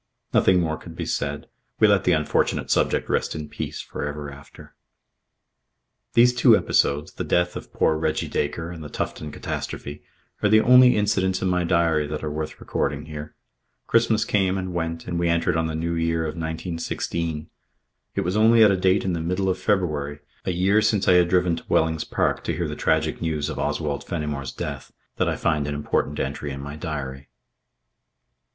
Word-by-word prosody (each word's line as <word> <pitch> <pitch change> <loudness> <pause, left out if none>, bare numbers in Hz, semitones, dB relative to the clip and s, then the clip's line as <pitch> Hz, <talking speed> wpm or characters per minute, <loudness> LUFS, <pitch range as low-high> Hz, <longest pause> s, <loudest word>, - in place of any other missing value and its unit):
Nothing 95 -1 +4
more 80 -2 -1
could - - -11
be - - -4
said. - - -2 0.3
We 110 - +6
let 100 -2 +3
the 90 - +4
unfortunate 75 -3 +1
subject - - +1
rest - - -1
in 75 -1 -6
peace - - -5
for - - -6
ever 75 0 -5
after. 70 +1 -14 1.4
These 120 +1 +6
two 125 - +6
episodes, 75 +1 +1
the - - -4
death 90 0 +1
of - - -8
poor 80 - +2
Reggie 80 0 -1
Dacre 80 +3 -2
and 80 -3 -8
the 75 - -8
Tufton 75 -1 -4
catastrophe, 75 0 -5 0.4
are 105 - +3
the 110 +1 +6
only 125 +1 +7
incidents 95 -3 +1
in 95 - +1
my 90 -1 +1
diary 85 -3 +2
that 75 +1 -5
are 75 - -2
worth 75 +1 -5
recording 70 0 -2
here. 75 -1 -8 0.5
Christmas 115 -2 +2
came 95 -2 +1
and 95 -1 -4
went 85 -1 -3
and 85 - -2
we 85 0 +1
entered 85 -1 +1
on 80 0 +1
the 80 - -3
new 85 +1 -2
year 80 0 0
of 80 - -2
1916. 80 -1 -3 0.7
It - - +1
was 90 +3 -1
only 110 +1 +6
at 105 - +6
a 95 - +2
date 95 +1 +2
in 95 - 0
the 85 - -2
middle 90 +3 0
of 95 - -1
February, 75 -8 0 0.3
a - - 0
year 95 +4 +3
since 105 -3 +1
I - - +6
had 90 -1 +4
driven 90 -2 +2
to - - -10
Wellings 80 0 +1
Park - - 0
to - - -1
hear - - -2
the - - -5
tragic 80 0 0
news 80 -3 -1
of - - -5
Oswald 75 -3 -2
Fenimore's 75 -5 -4
death, - - -6 0.3
that - - +1
I - - -1
find 75 -3 0
an 75 - -2
important 75 0 -1
entry 70 +2 -3
in 70 - -6
my 70 +1 -7
diary. 70 -4 -5
80 Hz, 195 wpm, -24 LUFS, 75-95 Hz, 1.4 s, only